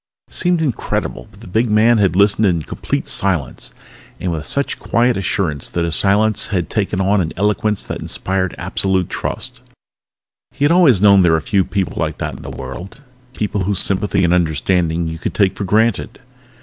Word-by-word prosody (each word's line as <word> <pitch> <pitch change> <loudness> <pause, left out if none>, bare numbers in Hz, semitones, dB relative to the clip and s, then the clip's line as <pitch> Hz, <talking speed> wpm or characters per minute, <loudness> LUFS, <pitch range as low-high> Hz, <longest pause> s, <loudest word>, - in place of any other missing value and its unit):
It - - -19
seemed 175 -2 +1
incredible, 135 -8 -3
but - - -19
the - - -11
big 110 +6 0
man 110 +2 +4
had 95 -4 +2
listened 100 +2 +3
in 85 -4 0
complete - - -4
silence, 85 -10 -1 0.5
and 90 - -2
with 80 -2 -4
such 140 0 -1
quiet 120 +1 +1
assurance 95 -7 -2
that 85 -1 -1
his 85 - 0
silence 105 +2 +2
had 90 -5 -2
taken 100 -2 -1
on 95 +1 +2
an 80 -2 -3
eloquence 105 +1 0
that - - -5
inspired 95 -1 -2
absolute 95 -2 -1
trust. - - -5 0.9
He 145 - -1
had 145 - +3
always 160 - +5
known 100 -2 +6
there 85 -2 +4
were - - +4
a - - -3
few 100 -2 +2
people 95 -2 -3
like - - -2
that - - -4
in - - -11
the - - -8
world, 65 - -8 0.4
people 105 -2 -2
whose 100 0 -1
sympathy 100 0 +1
and 85 0 +3
understanding 85 0 0
you 80 0 -5
could - - -4
take 100 -3 +2
for 100 - -4
granted. 110 +3 0
95 Hz, 190 wpm, -18 LUFS, 90-105 Hz, 0.9 s, known